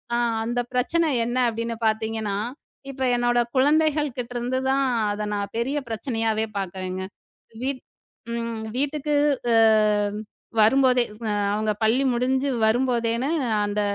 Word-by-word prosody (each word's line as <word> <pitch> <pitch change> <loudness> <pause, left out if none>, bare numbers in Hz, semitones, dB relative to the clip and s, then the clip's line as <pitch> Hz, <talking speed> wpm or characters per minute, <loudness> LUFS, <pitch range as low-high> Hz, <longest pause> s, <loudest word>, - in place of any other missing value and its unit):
அ - - +2 0.3
அந்த 240 +1 -1 0.2
பிரச்சனை 320 +6 +2 0.2
என்ன 240 +1 -2
அப்பிடின்னு 230 0 -4
பார்த்தீங்கன்னா, 220 -2 -1 0.5
இப்ப 265 -1 -5
என்னோட 240 0 +2 0.2
குழந்தைகள் 300 +2 +3
கிட்டருந்து 245 +1 -3
தான் 270 +1 +2 0.3
அத 210 +1 -3
நான் 200 -1 -2
பெரிய 265 +5 -1
பிரச்சனையாவே 225 -2 -1
பார்க்குறேங்க. 185 0 -4 0.6
வீட் 260 0 -2 0.5
ம் 230 -1 -4
வீட்டுக்கு 290 +2 -1 0.4
அ - - +4 1.1
வரும்போதே, 250 +2 +4 0.3
அ - - 0 0.2
அவுங்க 215 0 0
பள்ளி 235 +5 +3
முடிஞ்சு 260 +3 +1 0.2
வரும்போதேன்னு 235 +1 +1 0.4
அந்த 205 0 -1
240 Hz, 115 wpm, -24 LUFS, 220-265 Hz, 1.1 s, அ